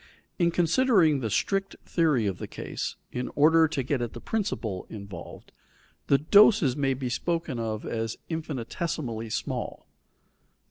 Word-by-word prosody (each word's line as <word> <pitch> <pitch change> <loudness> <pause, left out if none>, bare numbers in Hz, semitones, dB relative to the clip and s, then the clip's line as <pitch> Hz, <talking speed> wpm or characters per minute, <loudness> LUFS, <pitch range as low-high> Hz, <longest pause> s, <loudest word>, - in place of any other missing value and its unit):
In 170 -1 +4
considering 170 - +3
the 115 -4 -2
strict 195 - 0
theory 155 -9 +2
of 95 -3 -2
the - - -5
case, - - -5 0.2
in 125 0 -3
order 160 +2 +5
to 135 -3 -2
get 135 0 -1
at 120 -2 -3
the 120 - -7
principle 120 - -3
involved, 100 -4 -9 0.6
the 140 - +5
doses 175 - +5
may 135 -2 +1
be 130 0 -4
spoken 165 +1 -2
of 110 -2 -3
as 115 -1 -3
infinitesimally 140 -5 -4
small. - - -4
140 Hz, 140 wpm, -27 LUFS, 115-165 Hz, 0.6 s, order